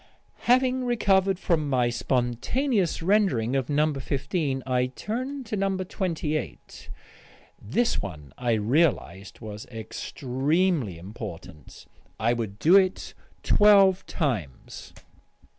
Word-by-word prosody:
Having 255 0 +3
recovered 195 -5 +2
from 160 -5 0
my 125 -3 +2
spontaneous 160 - 0
rendering 170 - +2
of 135 -3 -1
No. 150 +1 +2
15 135 0 -2
I 125 -1 +1
turned 255 - -5
to 215 - -3
No. 195 -1 0
28. 170 -5 -4 0.7
This 230 - 0
one, 75 -9 -8
I 120 -2 0
realised, 110 - 0
was 105 -1 -8
extremely 130 - -1
important. 90 - -10 0.3
I 115 +3 +2
would 110 -4 -4
do 165 - +5
it 190 -1 +2 0.3
twelve 200 -3 +5
times. 105 - -4
145 Hz, 105 wpm, -26 LUFS, 115-195 Hz, 0.7 s, do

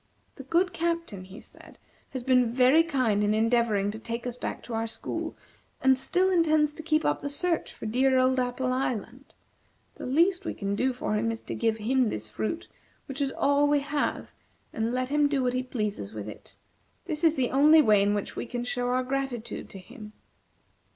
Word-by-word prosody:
"The - - -9
good 345 +7 +1
Captain," 335 - -2
he 190 +4 -11
said, - - -16 0.3
"has 260 -2 -5
been 250 -2 +3
very 255 +6 +5
kind 255 -10 +1
in 210 +1 +2
endeavoring 220 -3 +2
to 220 - -8
take 235 +1 -5
us 245 -1 -3
back - - -5
to 240 - -8
our 225 0 -1
school, 225 - -5 0.4
and 265 0 +4
still 355 +9 +1
intends 310 -4 +3
to 315 - -8
keep 315 0 +1
up - - +1
the 285 - -3
search 335 +3 -1
for - - -10
dear 260 +4 +2
old 255 0 +3
Apple 255 0 -1
Island. 255 0 -4 0.6
The - - -6
least 350 +8 +2
we - - -4
can 200 0 -3
do 260 +5 +1
for 245 -3 -3
him 225 +2 0
is 225 - -6
to - - -5
give 225 -1 0
him 245 +2 +1
this 110 - -4
fruit, 220 - -4 0.4
which 275 0 -6
is 275 -1 0
all 285 +1 +2
we 290 -1 +3
have, 290 +1 -2 0.4
and 225 +1 -1
let 255 +1 -1
him 295 0 +3
do 275 -2 0
what 250 0 +1
he 255 - 0
pleases 210 - -4
with 105 -1 -6
it. 105 - -11 0.5
This 315 -2 -3
is 325 -1 +4
the 255 -3 0
only 300 +3 +6
way 210 -5 +5
in 205 +1 +2
which 205 - -4
we - - -4
can 245 0 -4
show 245 0 -2
our 255 +1 +1
gratitude 260 -3 -4
to - - -9
him." 215 +2 -12
255 Hz, 205 wpm, -27 LUFS, 225-290 Hz, 0.6 s, only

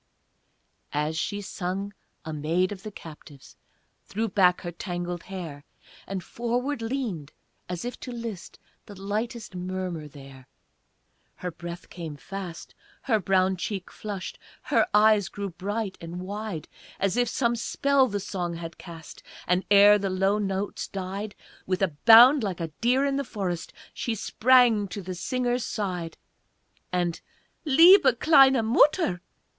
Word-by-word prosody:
As 150 +2 -1
she 205 +5 -2
sung, 195 +1 -4 0.3
a 160 - -5
maid 165 +5 0
of 195 -2 -7
the 215 - -7
captives 150 -6 -13 0.5
Threw 220 +3 -2
back 185 -3 +3
her 175 - -5
tangled 175 -1 -5
hair, 170 -7 -7 0.4
And 190 -2 -4
forward 245 +5 -2
leaned 225 - -4 0.4
as 180 +4 -4
if 245 - -5
to 250 - -7
list 230 -7 -7 0.3
The 200 -2 -11
lightest 215 +3 -4
murmur 180 -3 -4
there; 135 -3 -13 0.9
Her 180 - -5
breath 170 +1 -8
came 165 -4 -7
fast, 180 +2 -8 0.3
her 225 -5 +2
brown 190 0 +2
cheek 190 +1 -4
flushed, 205 -3 -6 0.2
Her - - +2
eyes 210 -3 +4
grew 200 +1 -5
bright 200 +3 -4
and 170 +1 -7
wide 200 -3 -5 0.3
As 195 -1 +1
if 245 -1 +2
some 235 0 +1
spell 275 +3 +2
the 205 -3 -3
song 175 -3 -4
had 165 -1 -8
cast, 165 -3 -11 0.2
And, 180 +1 +1
ere 205 +1 +7
the 195 -1 -2
low 195 +2 +1
notes 195 0 -3
died, 195 +2 -5 0.3
With 185 +1 0
a 190 - +3 0.2
bound 245 +5 +9
like 195 -5 -3
a 165 -1 -3
deer 255 +4 +3
in 275 -1 0
the 280 - -1
forest 185 -8 -4 0.2
She 230 - -2
sprang 235 -1 +4
to 200 0 -7
the 185 +1 -5
singer's 245 +6 -1
side, 180 -5 -4 0.7
And, 175 -2 -1 0.4
"Liebe, 320 0 +7
kleine 270 -6 +6
Mutter!" 235 - +3
195 Hz, 145 wpm, -26 LUFS, 175-225 Hz, 0.9 s, bound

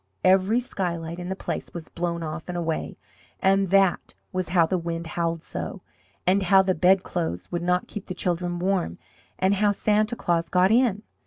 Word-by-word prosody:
Every 190 +5 +4
skylight 170 -7 -3
in 175 0 -5
the 190 - -2
place - - -5
was 165 -3 -6
blown 170 -1 -3
off 155 +2 -6
and 175 - -3
away, 165 -2 -3 0.4
and 195 0 +3
that 195 -1 +2 0.2
was 185 -2 -2
how 175 -2 +4
the 185 +2 -1
wind 170 0 -4
howled 165 0 -2
so, - - -6 0.4
and 190 +2 +3
how 190 +1 +5
the 190 0 +1
bedclothes 180 - +1
would 175 - -2
not 180 +1 +1
keep 210 -2 -7
the 185 - -5
children 175 -1 -1
warm, 180 - -1 0.4
and 190 +1 +2
how 205 +1 +3
Santa 215 +3 +1
Claus 170 -5 0
got 185 +2 +3
in. 225 -3 +3
180 Hz, 180 wpm, -25 LUFS, 170-195 Hz, 0.4 s, how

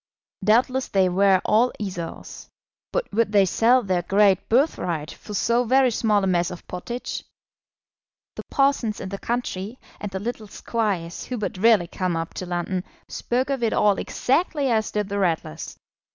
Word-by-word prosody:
Doubtless 250 +5 +2
they 190 -2 +2
were 190 +1 +4
all 230 +4 +3
Esaus; 180 -5 -6 0.4
but - - -1
would 220 0 +2
they 200 -2 +5
sell 240 +7 +3
their 185 -3 0
great 195 +2 +3
birthright 180 - +1
for 210 - -9
so 235 +4 +2
very 255 +1 +3
small 215 -3 +2
a - - +2
mess 175 -2 +1
of 180 - -10
pottage? 235 +7 -5 1.1
The - - -5
parsons 275 -6 +1
in 190 - -6
the 200 0 -5
country, 235 -2 -3 0.2
and 205 - -4
the 190 0 -4
little 220 +1 -5
squires 200 -6 -3
who 250 - -4
but 210 - -3
rarely 220 -4 +5
come 175 0 -2
up 165 0 -4
to 185 - -6
London, 180 +1 -2 0.2
spoke 255 +3 -2
of 270 -3 -1
it 230 - +1
all 205 -2 +3
exactly 285 -1 0
as 220 -1 +1
did 210 -1 -2
the 200 0 -2
Ratlers. 165 - -2
210 Hz, 165 wpm, -23 LUFS, 185-240 Hz, 1.1 s, they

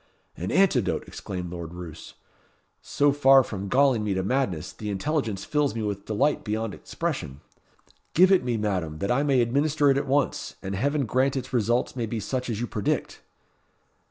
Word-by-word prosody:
"An 90 +3 -4
antidote!" 160 - +2
exclaimed 90 -3 -6
Lord 85 -1 -7
Roos. 90 -3 -9 0.7
"So 145 0 +2
far 135 -1 +6
from 100 -4 -5
galling 130 -1 +3
me 100 -2 -1
to 95 - -1
madness, 100 - -1
the 105 - -6
intelligence 110 -2 -2
fills 150 -4 0
me 115 - -2
with 100 -1 -3
delight 135 +8 +1
beyond 110 0 -2
expression. 70 +1 -4 0.7
Give 185 +3 +6
it 190 - +5
me, 120 -2 -1
Madam, 95 -7 -2
that 100 +8 -1
I 125 +3 +2
may 140 -3 +3
administer 145 +4 +2
it 135 - +2
at 140 - -1
once; 140 0 0
and 95 - -4
heaven 140 +7 0
grant 130 +4 +1
its 130 0 -5
results 120 +2 +1
may 120 -3 -2
be 115 +1 -3
such 125 +5 -3
as 110 -3 -2
you 120 - -1
predict!" 105 -3 -2
120 Hz, 180 wpm, -26 LUFS, 100-140 Hz, 0.7 s, far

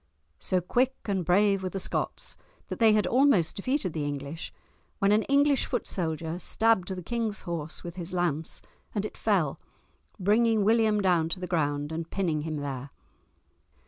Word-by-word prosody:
So 185 -1 0
quick 250 +8 +1
and 195 -3 0
brave 195 +3 +3
were 185 - -2
the 195 - -5
Scots - - -3 0.3
that - - -5
they 225 -2 +6
had 210 -1 +3
almost 250 - +3
defeated 205 - -1
the 155 - -2
English 145 +2 -5 0.5
when 200 0 +2
an 210 +1 +4
English 280 0 +3
foot 245 - -2
soldier 165 -1 -2
stabbed 220 -2 +2
the 185 -2 -5
king's 225 +1 -2
horse 165 -3 -5
with 175 +1 -8
his 175 0 -5
lance, 170 -4 -2 0.3
and - - 0
it - - -6
fell, - - +1 0.6
bringing 215 +2 +3
William 220 -1 +3
down 175 -4 +2
to 175 - -3
the 180 - -4
ground 145 -4 -1
and 165 +1 -4
pinning 170 -6 -1
him 155 0 -4
there. 140 -2 -4
185 Hz, 170 wpm, -28 LUFS, 160-215 Hz, 0.6 s, they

